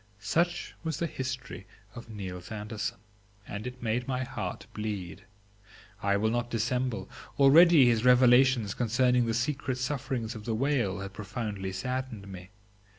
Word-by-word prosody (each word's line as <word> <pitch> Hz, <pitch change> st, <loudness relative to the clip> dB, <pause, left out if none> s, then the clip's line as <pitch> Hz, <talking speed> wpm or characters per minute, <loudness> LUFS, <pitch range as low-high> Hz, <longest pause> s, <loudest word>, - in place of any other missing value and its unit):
Such 170 Hz, -, 0 dB
was 160 Hz, -1 st, -2 dB
the 170 Hz, -, -1 dB
history 130 Hz, -8 st, -5 dB, 0.3 s
of 120 Hz, +1 st, -10 dB
Niels 95 Hz, -4 st, -7 dB
Andersen, 105 Hz, 0 st, -4 dB, 0.5 s
and 105 Hz, +4 st, -5 dB
it 125 Hz, -1 st, -8 dB
made 120 Hz, +2 st, -1 dB
my 130 Hz, -1 st, -1 dB
heart 130 Hz, -4 st, -5 dB
bleed. 100 Hz, -6 st, -5 dB, 0.8 s
I 100 Hz, 0 st, +2 dB
will 110 Hz, +2 st, +1 dB
not 120 Hz, 0 st, -1 dB
dissemble; 120 Hz, +1 st, -1 dB, 0.3 s
already 150 Hz, +1 st, +7 dB
his 115 Hz, -2 st, +3 dB
revelations 125 Hz, -3 st, +5 dB
concerning 125 Hz, +1 st, +2 dB
the 115 Hz, -, 0 dB
secret 130 Hz, +1 st, -1 dB
sufferings 130 Hz, -3 st, -2 dB
of 110 Hz, -3 st, -9 dB
the 115 Hz, -, -1 dB
whale 115 Hz, -7 st, 0 dB
had 100 Hz, 0 st, -7 dB
profoundly 100 Hz, -2 st, -4 dB
saddened 120 Hz, +1 st, -4 dB
me. 95 Hz, -1 st, -9 dB
120 Hz, 145 wpm, -29 LUFS, 105-130 Hz, 0.8 s, already